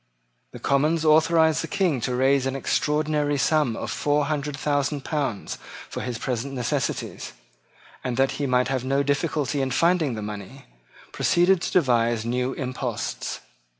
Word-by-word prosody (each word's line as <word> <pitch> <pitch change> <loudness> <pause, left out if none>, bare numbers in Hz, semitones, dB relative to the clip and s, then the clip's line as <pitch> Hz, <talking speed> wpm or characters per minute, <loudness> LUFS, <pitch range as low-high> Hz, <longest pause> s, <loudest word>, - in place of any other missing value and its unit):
The - - -9
Commons 155 +4 +1
authorised 160 0 +4
the - - -4
King 185 -10 0
to 125 +1 -1
raise 135 +1 +3
an 135 - -2
extraordinary 150 +1 0
sum 145 -3 +2
of - - -4
four 145 0 +1
hundred 145 -1 -2
thousand 145 0 0
pounds 140 -10 -3 0.3
for - - -4
his 125 -2 -3
present 130 +3 -3
necessities, 125 -2 -2 0.7
and 125 -2 -2
that 135 0 +3
he 140 - 0
might 125 0 +2
have 130 -2 -1
no 135 +2 +1
difficulty 145 0 0
in 135 - 0
finding 165 -1 +2
the 110 - -5
money, 105 +6 -8 0.5
proceeded 175 +1 +3
to - - -2
devise 120 -8 +2
new 125 +2 -1
imposts. 125 -3 -4
140 Hz, 150 wpm, -24 LUFS, 125-150 Hz, 0.7 s, authorised